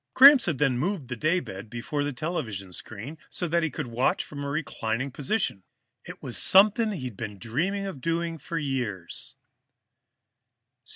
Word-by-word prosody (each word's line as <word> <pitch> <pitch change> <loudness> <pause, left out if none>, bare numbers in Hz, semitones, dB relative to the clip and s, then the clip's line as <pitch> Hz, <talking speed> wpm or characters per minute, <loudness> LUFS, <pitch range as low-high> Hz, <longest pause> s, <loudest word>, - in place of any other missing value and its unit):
Gramps 275 0 +9
had 155 -6 0
then 135 -4 +2
moved 170 -4 -2
the 125 - -2
daybed 115 - -1
before 120 +5 -3
the 145 - -1
television 125 - -4
screen, 115 - -8
so 175 - -2
that 170 +1 +2
he 160 - 0
could 125 - -4
watch 120 +2 +1
from 145 -1 -7
a 140 - -3
reclining 135 -3 -2
position. 145 - -1 0.4
It - - -10
was - - -1
something 215 +3 +6
he'd 130 - -5 0.2
dreamed 170 - -1
of 185 -9 -6
doing 165 +1 -1
for 165 - -4
years. 125 - -3
145 Hz, 155 wpm, -27 LUFS, 120-170 Hz, 0.4 s, Gramps